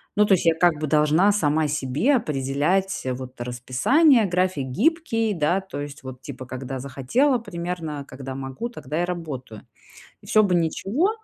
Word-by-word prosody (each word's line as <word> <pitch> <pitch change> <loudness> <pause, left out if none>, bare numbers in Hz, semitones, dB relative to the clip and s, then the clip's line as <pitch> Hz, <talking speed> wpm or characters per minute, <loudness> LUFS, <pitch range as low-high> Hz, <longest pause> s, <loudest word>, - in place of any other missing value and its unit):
ну, 210 0 +5
то 205 - +4
есть 180 - +2
я, 165 -1 +4
как 175 +1 +4
бы, 155 - -2
должна 155 +6 +4
сама 155 -6 +1
себе 150 - +1
определять, 155 - 0
вот, 130 0 -9
расписание. 140 - +3
График 180 -6 0
гибкий, 225 - +1
да, 170 +4 +1
то 190 -5 -8
есть 145 0 -7
вот, 130 -1 -9
типа, 130 -1 -8
когда 130 +1 -5
захотела 140 - +1
примерно, 170 -8 -5
когда 130 0 -7
могу, 135 - -5
тогда 155 - -4
и - - +1
работаю. 145 - -6 0.6
И - - -15
всё 215 - +4
бы 195 -4 +2
ничего, 195 - +1
160 Hz, 165 wpm, -24 LUFS, 135-195 Hz, 0.6 s, ну